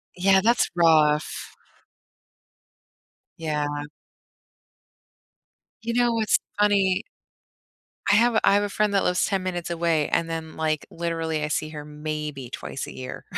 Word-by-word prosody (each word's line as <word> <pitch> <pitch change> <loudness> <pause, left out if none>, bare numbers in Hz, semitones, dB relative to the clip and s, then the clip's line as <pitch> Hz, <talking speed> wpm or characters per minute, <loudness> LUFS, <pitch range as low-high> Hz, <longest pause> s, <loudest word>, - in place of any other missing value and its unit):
Yeah, 190 +1 +4
that's 235 +3 +3
rough. 155 -3 +2 1.8
Yeah. 150 -2 -2 2.0
You 230 +1 -3
know 240 0 +3
what's 220 -2 +3 0.2
funny? 200 -3 +3 1.1
I - - +6
have 230 +1 +4
I - - +5
have 205 - +3
a 205 - -1
friend 210 0 0
that 195 - +3
lives 180 -1 +2
10 195 -2 -1
minutes 180 -2 -3
away 165 -3 +1
and 165 - 0
then, 160 -1 -5
like, 155 -1 -1
literally 165 -2 -2
I - - -2
see 155 0 -1
her 150 -1 -7
maybe 150 -3 -5
twice - - -6
a - - -9
year, 65 0 -7
165 Hz, 135 wpm, -25 LUFS, 150-195 Hz, 2.0 s, I